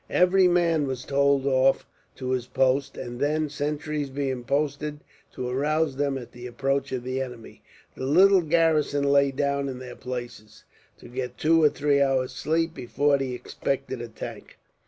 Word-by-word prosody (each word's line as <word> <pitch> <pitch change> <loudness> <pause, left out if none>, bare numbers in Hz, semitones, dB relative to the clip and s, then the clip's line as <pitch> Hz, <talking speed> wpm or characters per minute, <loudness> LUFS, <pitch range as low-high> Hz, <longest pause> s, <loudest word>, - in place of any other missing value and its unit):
Every 180 +1 +4
man 170 -4 +2
was 130 -1 -4
told 140 -1 +2
off 135 0 +3 0.3
to 130 -1 -4
his 125 -1 -1
post, 135 +2 +1
and 120 0 -6
then, 155 +1 0
sentries 150 0 -3
being 135 -2 -3
posted 145 +2 -2 0.3
to 125 - -4
arouse 150 +3 0
them 140 0 0
at 125 -3 -9
the 120 0 -9
approach 135 +2 -1
of 130 -2 -3
the 130 +1 -2
enemy, 125 -3 -8 0.3
the 130 - -4
little 190 +6 +6
garrison 160 -3 +2
lay 140 0 +4
down 140 0 -1
in 130 - -5
their 125 -1 -9
places, 120 -4 -8 0.3
to - - -13
get 125 0 -5
two 165 +1 +3
or 150 - +6
three 145 -1 +1
hours' 130 -2 +1
sleep 165 +5 0
before 140 +2 +1
the 130 -2 -2
expected 130 0 -3
attack. 115 -2 -8
140 Hz, 165 wpm, -25 LUFS, 130-150 Hz, 0.3 s, little